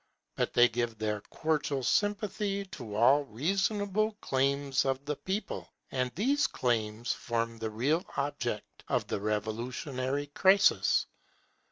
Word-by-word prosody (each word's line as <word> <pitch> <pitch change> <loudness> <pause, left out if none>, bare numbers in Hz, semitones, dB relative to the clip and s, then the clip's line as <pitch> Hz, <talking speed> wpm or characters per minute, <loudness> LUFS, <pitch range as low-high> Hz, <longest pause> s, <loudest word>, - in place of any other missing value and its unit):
But - - -1
they 120 0 +8
give 120 -1 -2
their 105 -1 -2
cordial 150 -4 -1
sympathy 205 - 0
to 120 - -8
all 135 +7 +5
reasonable 200 - 0
claims 140 -5 +1
of 135 +1 -1
the 150 +1 -1
people; 195 +7 -4 0.2
and 125 -1 -1
these 275 - +2
claims 115 -1 -1
form 115 -1 -2
the 110 0 -2
real 140 - +1
object 140 -6 -3
of - - 0
the - - -2
revolutionary 125 +6 -2
crisis. 190 +7 +4
135 Hz, 125 wpm, -30 LUFS, 115-185 Hz, 0.2 s, they